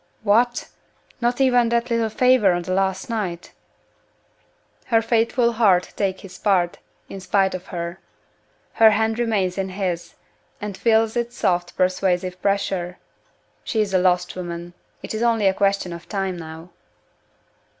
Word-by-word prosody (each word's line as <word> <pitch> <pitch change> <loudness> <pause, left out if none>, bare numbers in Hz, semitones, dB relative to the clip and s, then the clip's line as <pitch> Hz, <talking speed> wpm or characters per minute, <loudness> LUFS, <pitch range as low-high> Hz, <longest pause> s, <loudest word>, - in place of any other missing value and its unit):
"What! 235 +4 +2 0.5
not 240 +2 0
even 245 -3 +4
that 235 +1 0
little 230 -1 +1
favor 245 -4 +4
on 175 0 -2
the 185 - -3
last 190 0 0
night?" 190 -7 -4 1.4
Her 225 -2 +4
faithful 235 +1 +2
heart 200 -6 +2
takes 190 -2 -2
his 195 - -11
part, 180 -4 +1 0.3
in 195 - -8
spite 190 +1 +1
of 185 0 -6
her. 170 +1 -5 0.7
Her 225 -1 +7
hand 220 +2 +1
remains 200 -6 0
in 190 0 -2
his, 185 -3 -4 0.4
and 205 -2 -5
feels 225 +1 +2
its 240 0 -2
soft 175 -1 0
persuasive 185 0 0
pressure. 195 -3 -1 0.7
She 220 - -2
is 205 -2 0
a 185 - +4
lost 180 -1 +1
woman. 175 -1 -6 0.3
It - - -5
is 220 - -3
only 230 -3 +2
a 190 - +4
question 195 -2 0
of 170 0 -11
time 195 -2 -2
now! 160 +1 -9
195 Hz, 150 wpm, -22 LUFS, 180-225 Hz, 1.4 s, Her